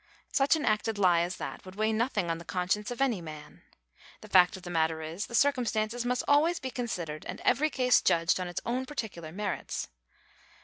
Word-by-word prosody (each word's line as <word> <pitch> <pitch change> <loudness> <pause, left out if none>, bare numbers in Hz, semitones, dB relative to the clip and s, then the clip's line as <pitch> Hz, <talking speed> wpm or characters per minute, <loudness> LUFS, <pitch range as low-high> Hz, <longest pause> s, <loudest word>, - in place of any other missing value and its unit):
Such 280 +3 +4
an 310 - -2
acted 215 0 +1
lie 180 -4 +4
as 175 +1 -2
that - - -6
would 185 0 -11
weigh 215 +1 +1
nothing 215 -6 0
on 165 - -3
the - - -9
conscience 190 +4 -1
of 245 +2 -5
any 240 -9 +1
man. 155 -2 -10 0.6
The - - -11
fact 180 0 +5
of 185 - -13
the 175 - -6
matter 160 -1 0
is, 165 +6 -4
the 235 - -5
circumstances 240 -4 +1
must 250 0 0
always 315 +4 +4
be 260 - -5
considered 175 -12 -4
and - - -6
every 310 +2 +2
case 250 -3 +3
judged 165 +2 +2
on 180 - -3
its 175 - -4
own 255 +2 -1
particular 200 - -5
merits. 205 +4 -4
210 Hz, 205 wpm, -29 LUFS, 175-250 Hz, 0.6 s, fact